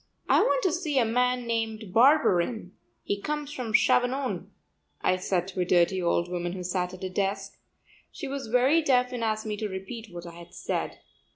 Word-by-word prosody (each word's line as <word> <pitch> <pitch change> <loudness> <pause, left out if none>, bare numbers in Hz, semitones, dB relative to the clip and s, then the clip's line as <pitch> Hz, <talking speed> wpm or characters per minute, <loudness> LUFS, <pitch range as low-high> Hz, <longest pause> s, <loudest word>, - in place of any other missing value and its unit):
"I - - +5
want - - +2
to 375 - +3
see 315 -4 -1
a 245 - +4
man 250 +2 +1
named 225 -4 -3
Barberin; 225 - +3 0.3
he 200 0 -2
comes 295 +1 -3
from 245 -5 -4
Chavanon," 250 +4 +2 0.5
I 185 - +2
said 185 -1 -1
to 190 - -6
a - - +3
dirty 180 +1 +3
old 170 0 +1
woman 175 -1 -3
who 185 -1 -5
sat 180 0 -2
at 185 - -12
a 185 - -2
desk. 195 0 -2 0.5
She - - -6
was 275 -2 -5
very 255 +8 +4
deaf 250 -4 +2
and 245 -2 -3
asked 220 0 -1
me 210 -1 -3
to 215 0 -3
repeat 195 +3 -7
what 175 0 -8
I 170 - -8
had 170 0 -13
said. - - -3
220 Hz, 195 wpm, -27 LUFS, 185-250 Hz, 0.5 s, I